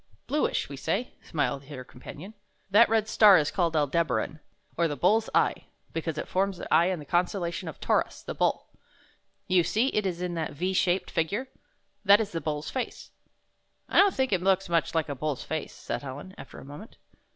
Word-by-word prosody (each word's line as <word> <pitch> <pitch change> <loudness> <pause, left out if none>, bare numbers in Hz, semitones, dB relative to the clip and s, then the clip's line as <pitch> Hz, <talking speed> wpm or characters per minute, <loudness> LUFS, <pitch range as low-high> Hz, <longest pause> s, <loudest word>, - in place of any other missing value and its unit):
"Bluish, 300 +2 0
we - - -8
say," 250 - -2
smiled 140 -3 -2
her 135 -3 -8
companion. 150 - -11 0.4
"That 225 +4 +6
red 220 -1 +2
star 210 -3 +7
is 150 -1 +1
called 170 -4 0
Al 150 -1 +3
deb' 165 +2 0
a - - 0
ran, 130 +8 -3 0.4
or 170 0 +2
the 145 - -3
Bull's 215 - +2
Eye, - - +2 0.3
because 160 -1 -3
it - - -4
forms 195 0 0
the - - -4
eye 170 +2 +5
in 185 -1 0
the 150 - -9
constellation 175 +1 -1
of 160 - -7
Tau' - - +2
rus, - - -3
the - - -5
Bull. - - 0 0.8
You 185 -1 +4
see 225 +9 +1
it 210 -5 0
is 175 -2 -3
in 180 -1 -3
that 160 -3 -3
V 180 +6 -2
shaped 185 0 +1
figui'e? 200 +10 0 0.6
That 200 0 +7
is 210 -2 -2
the 165 - -3
Bull's 150 -1 -3
face." 255 -3 -5 0.8
"I - - +3
don't 400 -1 +5
think 265 -4 +1
it 180 - +1
looks 190 0 +2
much 165 -1 +1
like 160 -2 +1
a 145 - -3
bull's 140 0 -3
face," 160 -1 -4
said - - -4
Helen, 145 +7 -8
after - - -11
a - - -10
moment. 145 +11 -11
175 Hz, 210 wpm, -27 LUFS, 155-200 Hz, 0.8 s, star